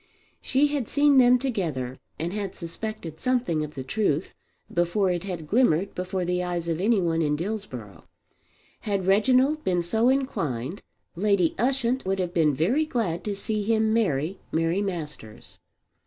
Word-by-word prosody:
She 275 +2 +2
had 285 -6 -2
seen 285 -2 +4
them 250 0 +6
together 160 - -3 0.2
and 170 +3 -3
had 200 -2 -4
suspected 170 -1 -6
something 245 -12 0
of 150 0 -7
the 135 - -4
truth 165 0 -1 0.4
before 175 +3 +2
it 175 +1 -2
had 175 -5 -5
glimmered 200 -4 +2
before 185 0 -3
the 180 +1 0
eyes 175 -1 -3
of 165 +1 -1
any 215 +1 +3
one 165 -2 +1
in 150 -2 +1
Dillsborough. 150 - -6 0.7
Had 200 -3 -2
Reginald 255 +10 +3
been 180 -2 +1
so 220 +8 +2
inclined 165 - -1 0.3
Lady 195 -2 +2
Ushant 255 +1 +1
would 190 +1 -1
have 180 -2 -2
been 155 -4 +3
very 230 - +2
glad 205 - -1
to 205 -1 -2
see 210 +2 -2
him 220 +1 +2
marry 185 -5 0
Mary 165 +4 +1
Masters. 150 - -6
190 Hz, 155 wpm, -26 LUFS, 165-225 Hz, 0.7 s, them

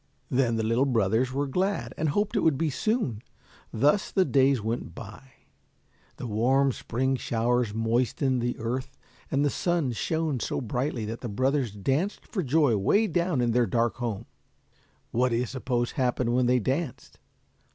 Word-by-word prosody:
Then 125 -3 +2
the 110 - -1
little 115 +5 +2
brothers 115 +1 +1
were 140 +2 -1
glad 140 - -1
and 155 0 0
hoped 205 +8 0
it - - +3
would 160 -7 +2
be 160 0 0
soon. 215 - -1 0.5
Thus 145 - +2
the 190 -2 +3
days 135 -1 +3
went 110 +3 -4
by. 110 +5 -10 0.9
The - - -6
warm 130 +5 +2
spring 130 +2 -1
showers 120 -1 0
moistened 120 +3 +1
the 120 +1 -2
earth, 130 +4 -4 0.3
and 140 +1 +1
the 145 - +1
sun 170 -7 0
shone 160 +3 -1
so - - -2
brightly 125 0 -2
that 115 +2 -6
the 120 - -4
brothers 130 +2 0
danced 135 - -1
for 200 - -3
joy 145 -4 +3
way 200 - +3
down 175 -8 0
in 120 -1 +2
their 120 0 +2
dark 120 -1 0
home. 115 -5 -3 0.9
What 125 +2 +2
do 115 - 0
you 120 +2 +1
suppose 125 -1 -2
happened 125 -2 0
when 125 0 +2
they 125 +1 +4
danced? 130 +2 -3
125 Hz, 170 wpm, -27 LUFS, 115-145 Hz, 0.9 s, they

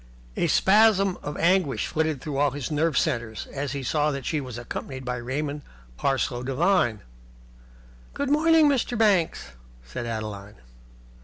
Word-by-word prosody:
A - - +1
spasm 200 -2 +4
of 145 - -5
anguish 175 -4 +2
flitted 155 -4 -1
through 145 -2 -4
all 145 +1 +3
his 140 +2 -5
nerve 155 0 +1
centres 120 -7 -1
as 140 -1 -3
he 140 -1 -4
saw 150 +3 +1
that 140 -3 -4
she 155 - -1
was 125 -3 -7
accompanied 130 +2 -6
by 125 0 -2
Raymond 140 +4 -3 0.3
Parsloe 130 - -1
Devine. 130 - +1 1.1
"Good 285 -1 -2
morning, 320 +1 +5
Mr. 250 -3 0
Banks," 200 - +2 0.3
said 65 - -6
Adeline. 105 -3 -5
145 Hz, 145 wpm, -25 LUFS, 125-185 Hz, 1.1 s, morning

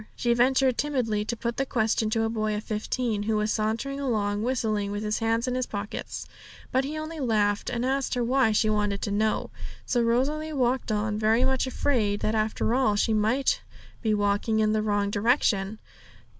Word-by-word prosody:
She 240 -1 +1
ventured 255 +1 +3
timidly 245 -8 0
to 235 +2 -3
put 235 +1 -3
the 270 - +1
question 220 -2 +1
to 225 +1 +1
a - - +1
boy 215 -1 -1
of 210 - -4
fifteen, 215 0 -2
who 215 +1 0
was 210 0 0
sauntering 230 +6 -2
along, 210 -6 0
whistling, 220 -4 0
with 205 +1 -3
his 210 0 -1
hands 225 +1 0
in 250 - 0
his 255 0 -1
pockets; 205 0 -5 0.5
but 260 +1 +2
he 295 +3 -4
only 310 +1 -5
laughed, 210 -5 +1
and 240 +1 -2
asked 270 0 0
her 245 - 0
why 255 -1 +3
she 215 +1 +2
wanted 210 -2 0
to 205 - -2
know. 215 +1 0 0.3
So 245 - +1
Rosalie 280 +7 0
walked 250 -3 0
on, 210 0 -1
very 220 +3 +3
much 265 0 +1
afraid 225 -6 0
that 215 - 0
after 220 +1 0
all 250 -5 +2
she 220 +2 +1
might 220 +6 +1 0.4
be 220 -2 +1
walking 205 +2 +1
in 215 0 +2
the 215 - +1
wrong 205 -1 0
direction. 210 -2 +1
225 Hz, 195 wpm, -26 LUFS, 210-255 Hz, 0.5 s, ventured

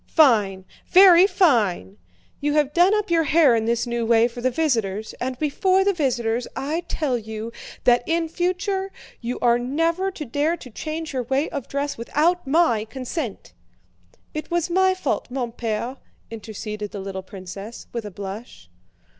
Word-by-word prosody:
"Fine, 210 - +3 0.2
very 370 -1 +8
fine! 210 - +2 0.4
You 290 0 0
have 295 -1 +2
done 360 +5 +5
up 420 -4 -1
your 330 -1 +3
hair 300 -5 +5
in 220 -1 0
this 235 +1 0
new 235 -1 -2
way 230 0 +4
for 240 0 -9
the 255 - +2
visitors, 225 -8 -1
and 255 0 -2
before 370 +7 +2
the 400 0 +2
visitors 245 -7 -1
I 315 +5 -2
tell 265 -6 -1
you 220 +1 -6 0.3
that 245 -1 +5
in 330 0 +1
future 370 +3 -1 0.3
you 240 +1 -4
are 240 0 +4
never 330 +9 0
to 330 -5 -7
dare 295 +7 0
to 250 - -12
change 315 +5 -5
your 260 - -1
way 270 +5 0
of 280 -4 -5
dress 280 -2 -3
without 315 +7 +1
my 270 -8 +3
consent." 255 - -5 0.8
"It 305 - -5
was 345 0 -1
my 375 +1 +3
fault, 370 - -2
mon 250 -2 -3
père," 235 +3 -3 0.3
interceded 215 -1 -6
the 200 - -7
little 190 0 -5
princess, 195 +3 -9
with 235 -1 -3
a 210 - -6
blush. 195 - -9
255 Hz, 165 wpm, -23 LUFS, 225-330 Hz, 0.8 s, very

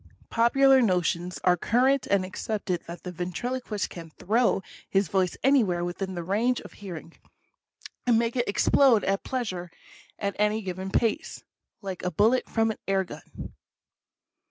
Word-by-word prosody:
Popular 265 +3 +5
notions 180 -3 0
are 180 -1 +5
current 255 +9 +2
and 195 -2 +2
accepted 190 -1 -3
that 170 0 -8
the 180 - -5
ventriloquist 205 +5 -3
can 165 -2 -9
throw 215 +4 +1 0.3
his 195 -1 +2
voice 185 -1 0
anywhere 210 -11 +3
within 190 +2 -4
the 175 - -4
range 225 +8 +1
of - - -12
hearing, 170 -4 -9 0.9
and 235 -2 +5
make 230 +1 0
it 245 -1 0
explode 235 +1 +4
at 195 0 0
pleas 245 -7 -2
are 175 -1 -6 0.5
at 200 -1 -2
any 210 +1 +1
given 190 0 -4
place, 225 +2 -1 0.4
like 190 -2 -5
a 180 - -1
bullet 220 +9 +2
from 225 -1 +1
an - - -7
air 195 -1 +2
gun. 180 - -10
200 Hz, 155 wpm, -27 LUFS, 180-235 Hz, 0.9 s, Popular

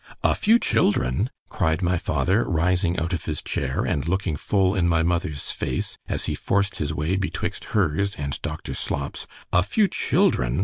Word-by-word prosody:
——A - - +4
few 225 +3 +4
children! 105 - +1 0.2
cried 80 +3 0
my 90 -1 +2
father, 100 +8 +1
rising 90 +1 +1
out 85 +2 -1
of 85 - -3
his 75 -2 -2
chair, 65 -1 -1
and 70 - -1
looking 95 -2 0
full 95 +4 +1
in 90 -4 +2
my 85 -1 +3
mother's 85 -4 -1
face, 65 - -3
as - - -1
he - - -1
forced 100 0 0
his 75 -1 -2
way 75 +4 -1
betwixt 95 0 -3
her's 100 +2 +1
and 70 -2 -4
doctor 75 +1 -5
Slop's—a 90 - -2
few 200 - +2
children! 65 - +1
85 Hz, 170 wpm, -24 LUFS, 75-95 Hz, 0.2 s, A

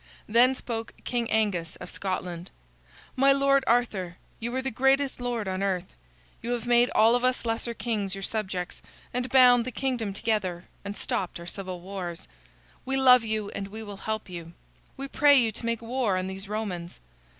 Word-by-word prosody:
Then 245 +4 +5
spoke 230 -3 -5
King 240 -2 -1
Angus 195 -7 0
of 180 - -10
Scotland: 180 -2 -4 0.7
"My 275 +1 +5
lord 275 0 +4
Arthur, 200 -7 +1 0.2
you 235 +1 -3
are 260 - 0
the 265 - -1
greatest 270 +3 +2
lord 240 -4 -2
on 185 0 -2
earth. 190 -2 0 0.6
You 240 - -2
have 240 -1 -3
made 240 0 +4
all 225 +2 +6
of 245 - 0
us 255 -1 +1
lesser 230 +1 -1
kings 205 -5 -2
your 195 - -7
subjects, 190 -4 -3 0.3
and 250 +1 -1
bound 245 -2 +7
the 255 - -4
kingdom 245 -4 -1
together, 195 -4 -1 0.2
and 200 +1 -5
stopped 180 -2 -2
our 170 - -9
civil 185 -1 -6
wars. 180 -2 -6 0.6
We 270 +1 -1
love 250 -2 +7
you 215 -2 -2
and 195 - -5
we 220 +3 -8
will 205 -2 -8
help 215 +2 -3
you. 170 -2 -8 0.4
We 275 +1 -4
pray 285 0 +5
you 230 -3 +2
to 225 - -7
make 230 0 -1
war 230 -5 0
on 185 - -1
these 190 +1 -6
Romans. 190 -5 -4
220 Hz, 185 wpm, -27 LUFS, 190-245 Hz, 0.7 s, bound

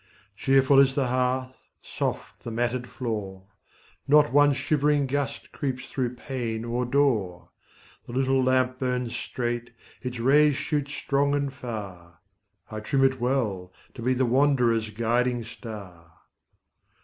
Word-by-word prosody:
Cheerful 135 +3 +4
is 135 -1 +4
the 135 -3 +1
hearth, 130 +1 -1
soft - - -4
the - - -5
matted 120 +2 -2
floor; 105 -6 -5 0.6
Not 145 -3 +5
one 145 0 +6
shivering 145 0 +1
gust 140 +1 -3
creeps 130 -3 -4
through 125 -3 -2
pane 120 -4 -4
or 120 +1 -1
door; 115 -10 +1 0.6
The 120 - -8
little 130 0 +2
lamp 130 0 +1
burns 125 -2 -2
straight, 120 -1 -3 0.3
its 125 -1 -5
rays 145 +4 +4
shoot 150 -1 -1
strong 140 0 0
and 140 -1 -1
far: 100 -10 -8 0.5
I 110 - -4
trim 135 +5 +1
it 130 -2 +2
well, 110 -8 -1 0.2
to - - -9
be 130 +2 +1
the 130 +1 +2
wanderer's 120 -4 +2
guiding 120 +2 0
star. 100 -7 -10
125 Hz, 135 wpm, -26 LUFS, 115-135 Hz, 0.6 s, one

